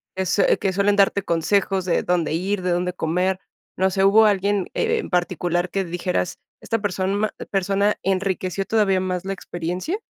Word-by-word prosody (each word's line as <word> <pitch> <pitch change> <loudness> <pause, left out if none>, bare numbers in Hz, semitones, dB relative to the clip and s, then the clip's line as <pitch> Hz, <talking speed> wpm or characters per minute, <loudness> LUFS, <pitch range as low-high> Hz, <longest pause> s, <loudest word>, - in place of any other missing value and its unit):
que 190 0 -1
sue 195 +2 +3
suelen 200 +2 +2
darte 200 0 +3
consejos 190 +3 +1
de 175 -2 +1
dónde 175 -2 0
ir, 185 +3 -1
de 180 0 -1
dónde 180 +1 0
comer? 180 +3 -1 0.4
No 190 +1 +3
sé, 190 +1 +1
¿hubo 215 +3 +6
alguien 200 -1 +1
en 455 -1 0
particular 175 0 0
que 195 +1 -1
dijeras, 180 +1 -2 0.2
esta 225 - -1
persona 200 +1 -1 0.2
persona 200 +1 +1
enriqueció 190 0 -1
todavía 195 -3 +2
más 185 -1 -3
la 195 - -2
experiencia? 180 - -4
190 Hz, 160 wpm, -22 LUFS, 180-200 Hz, 0.4 s, hubo